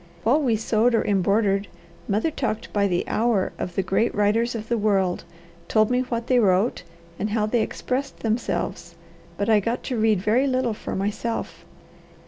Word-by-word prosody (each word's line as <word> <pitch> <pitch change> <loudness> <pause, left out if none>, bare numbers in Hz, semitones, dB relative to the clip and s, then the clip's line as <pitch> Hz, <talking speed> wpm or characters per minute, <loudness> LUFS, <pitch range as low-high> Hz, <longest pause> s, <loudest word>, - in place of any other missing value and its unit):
While 265 +8 +3
we 245 -6 +2
sewed 225 +2 +2
or - - +1
embroidered, 200 0 +1 0.4
mother 215 +10 0
talked 245 -7 -3
by 200 -1 +2
the 180 -2 -1
hour 225 -4 +1
of 180 - -4
the 195 - +1
great 195 +5 0
writers 225 +4 +1
of 220 -1 -5
the 235 - 0
world, 195 -4 +1 0.4
told 215 +1 +2
me 250 - +2
what 235 -2 -2
they 250 0 +3
wrote, 200 +2 +2 0.4
and 210 - -1
how 210 0 +1
they 225 +2 +1
expressed 265 +5 -3
themselves, 225 +1 -2 0.4
but 200 - -1
I 220 -2 +5
got 230 +4 -2
to 250 -4 -2
read 215 -3 +3
very 225 +8 +2
little 255 -3 0
for - - -6
myself." 210 +4 -3
220 Hz, 175 wpm, -24 LUFS, 205-240 Hz, 0.4 s, I